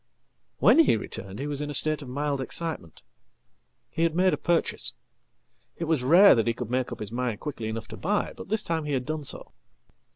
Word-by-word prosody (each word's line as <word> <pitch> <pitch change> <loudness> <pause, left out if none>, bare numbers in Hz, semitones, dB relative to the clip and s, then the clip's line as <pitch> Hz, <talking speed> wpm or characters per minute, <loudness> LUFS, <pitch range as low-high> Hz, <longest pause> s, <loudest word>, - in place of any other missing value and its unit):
"When - - +5
he 310 - +5
returned 100 -2 -7
he 140 - -4
was 145 -1 -3
in 150 - -4
a 145 - -3
state 155 0 +2
of 135 - -9
mild 140 +1 -2
excitement. 145 - -4 0.9
He - - -3
had 165 -1 +2
made 185 +1 +3
apurchase. 170 -1 0 0.8
It - - -4
was 155 -5 0
rare 175 +10 +7
that 115 -1 +1
he 115 - +1
could 120 -1 -6
make 130 0 -1
up - - -6
his 105 0 -5
mind 120 -3 -2
quickly 135 -7 -5
enough 110 0 -5
tobuy, 205 - -2
but - - -10
this 215 0 0
time 160 -2 -2
he 145 - -2
had 130 -2 -1
done 155 0 -3
so." - - -2
145 Hz, 205 wpm, -26 LUFS, 125-165 Hz, 0.9 s, rare